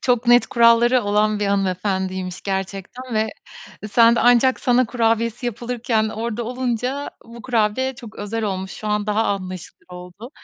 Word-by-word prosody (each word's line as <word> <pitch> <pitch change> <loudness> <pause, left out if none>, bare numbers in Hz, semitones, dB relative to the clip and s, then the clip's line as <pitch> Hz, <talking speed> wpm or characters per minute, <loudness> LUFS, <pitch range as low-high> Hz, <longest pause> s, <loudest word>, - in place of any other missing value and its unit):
Çok 245 -2 +1
net 240 0 +5
kuralları 235 +1 +4
olan 210 +1 +1
bir 205 - 0
hanımefendiymiş 190 -1 -2
gerçekten 195 +5 -5
ve 220 0 +1 0.6
sen 230 +2 +5
de - - +2
ancak 245 +2 +4
sana 250 0 +3
kurabiyesi 230 0 0
yapılırken 235 -1 -1
orada 230 +1 -4
olunca 255 +3 -3
bu 235 0 -12
kurabiye 250 +2 0
çok 230 -3 -12
özel 210 +2 -4
olmuş. 190 -1 -3
Şu 215 - -8
an 210 0 -1
daha 215 +2 +1
anlaşılır 185 -3 -5
oldu. 180 +7 -11
225 Hz, 150 wpm, -21 LUFS, 200-240 Hz, 0.6 s, net